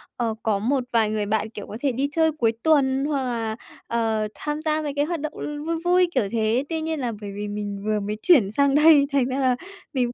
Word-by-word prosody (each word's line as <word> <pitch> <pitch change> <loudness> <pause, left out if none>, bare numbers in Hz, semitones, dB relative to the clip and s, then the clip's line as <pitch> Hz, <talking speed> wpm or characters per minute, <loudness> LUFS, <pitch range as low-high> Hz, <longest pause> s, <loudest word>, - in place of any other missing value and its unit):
ờ, 230 -2 -1
có 210 -3 +1
một 255 +5 0
vài 225 -2 +3
người 215 -1 -1
bạn, 215 +1 -1
kiểu, 210 -2 -9
có 215 - -7
thể 280 - +1
đi 270 +4 -1
chơi 320 0 +2
cuối 240 -7 +1
tuần 275 -3 +3
hoặc 285 -3 -1
là, 230 -3 -2 0.3
ờ, 225 -2 0
tham 295 0 -4
gia 310 -1 0
mấy 295 -2 -3
cái 290 0 +1
hoạt 340 +1 -3
động, 305 +1 -4
ừ, 295 0 -5
vui 335 +1 -1
vui, 360 0 +4
kiểu 255 - +3
thế. 230 +2 +1
Tuy 325 -1 -2
nhiên 320 -1 -2
là 245 -3 -2
bởi 205 -1 -6
vì 205 +1 -4
mình 205 -1 -5
vừa 215 0 +1
mới 210 +1 -4
chuyển 270 - +5
sang 280 +3 +2
đây, 300 -1 +7
thành 275 -3 +2
ra 260 +2 -2
là 260 -2 +2 0.4
mình 250 -3 0
260 Hz, 250 wpm, -24 LUFS, 220-295 Hz, 0.4 s, đây